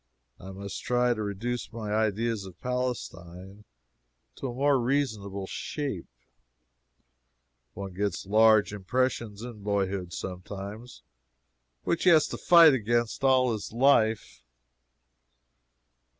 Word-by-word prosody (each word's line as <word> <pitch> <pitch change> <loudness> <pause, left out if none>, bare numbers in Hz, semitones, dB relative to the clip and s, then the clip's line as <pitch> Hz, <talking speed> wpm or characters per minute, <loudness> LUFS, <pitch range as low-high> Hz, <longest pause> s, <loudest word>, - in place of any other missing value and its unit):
I 95 - -10
must 100 +1 -7
try 125 0 +1
to 110 - -5
reduce 110 +4 -4
my 110 -2 -5
ideas 110 0 0
of 90 -3 -12
Palestine 105 -6 -5 0.7
to 135 - -4
a 120 - -5
more 140 +1 +2
reasonable 110 -7 -2
shape. 135 - -5 1.7
One 95 -1 -7
gets 100 -1 -3
large 110 +1 +4
impressions 110 +1 -2
in 120 -4 -9
boyhood, 100 -3 -2
sometimes, 100 +6 -8 0.8
which 170 - -1
he - - +7
has 160 -3 +6
to - - -6
fight 170 -4 +7
against 120 0 -1
all 130 -2 +4
his 105 - -6
life. 115 - +2
110 Hz, 110 wpm, -27 LUFS, 100-125 Hz, 1.7 s, he